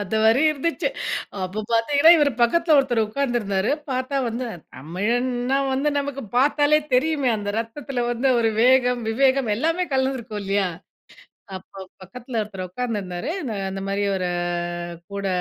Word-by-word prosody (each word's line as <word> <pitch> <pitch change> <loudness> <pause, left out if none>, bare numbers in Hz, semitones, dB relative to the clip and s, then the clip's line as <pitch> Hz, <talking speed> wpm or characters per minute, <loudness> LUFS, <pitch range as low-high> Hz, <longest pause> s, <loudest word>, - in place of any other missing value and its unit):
அந்த 205 +1 -2
மாரி 225 +5 +5
இருந்துச்சு. 305 +3 -1 0.6
அப்ப 200 +4 -4
பார்த்தீங்கன்னா, 285 +8 +5
இவர் 295 -3 +4
பக்கத்தில 315 +6 +3
ஒருத்தர் 250 -4 +2
உட்கார்ந்திருந்தாரு. 215 -5 -1 0.2
பார்த்தா 255 +2 -2
வந்து 240 +2 -3 0.3
தமிழன்னா 245 - -1 0.2
வந்து 275 +3 +1
நமக்கு 280 -1 -4
பார்த்தாலே 290 +3 +4 0.2
தெரியுமே. 285 0 +2
அந்த 205 -1 -5
ரத்தத்தில 245 +2 -3
வந்து 245 +3 +1
ஒரு 225 -1 +2
வேகம், 250 -1 +4
விவேகம் 265 0 +2
எல்லாமே 330 +7 0
கலந்திருக்கும். 260 -5 -1
இல்லையா? 195 -1 +1 0.9
அப்போ 190 - -17 0.3
பக்கத்தில 235 +5 -6
ஒருத்தர் 190 -3 -7
உட்கார்ந்திருந்தாரு. 200 - -4 0.4
அந்த 195 0 -5
மாரி 200 +1 -1
ஒரு 180 -1 -1 0.8
கூட 200 -1 -3
245 Hz, 130 wpm, -23 LUFS, 205-275 Hz, 0.9 s, மாரி